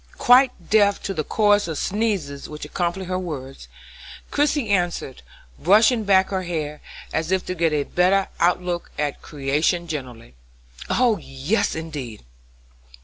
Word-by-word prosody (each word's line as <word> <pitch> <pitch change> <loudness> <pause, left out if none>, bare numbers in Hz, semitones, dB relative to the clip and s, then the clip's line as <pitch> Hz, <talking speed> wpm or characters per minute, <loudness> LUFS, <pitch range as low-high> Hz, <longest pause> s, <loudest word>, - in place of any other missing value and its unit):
Quite 250 -7 +4
deaf 205 -2 +4
to 195 - -3
the 155 -4 -2
chorus 205 +2 +2
of 160 -3 -4
sneezes 195 -10 -2
which 150 -1 -7
accompanied 175 +4 -2
her 185 0 -2
words, 135 - -7 0.6
Christie 290 -5 +1
answered, 175 -8 -1 0.4
brushing 215 - +4
back 190 -1 +4
her 190 -1 -1
hair, 155 -4 -4 0.3
as 160 +2 -1
if 190 -1 +1
to 185 - -3
get 165 -2 +1
a 150 -1 +1
better 185 +5 +2
out 180 +1 +2
look 175 -1 -3
at 145 -1 -2
creation 150 +5 -1
generally: 125 -7 -7 0.6
"Oh, 240 -5 +2
yes, 135 +8 -1
indeed! 145 - -7
175 Hz, 145 wpm, -22 LUFS, 150-200 Hz, 0.6 s, Quite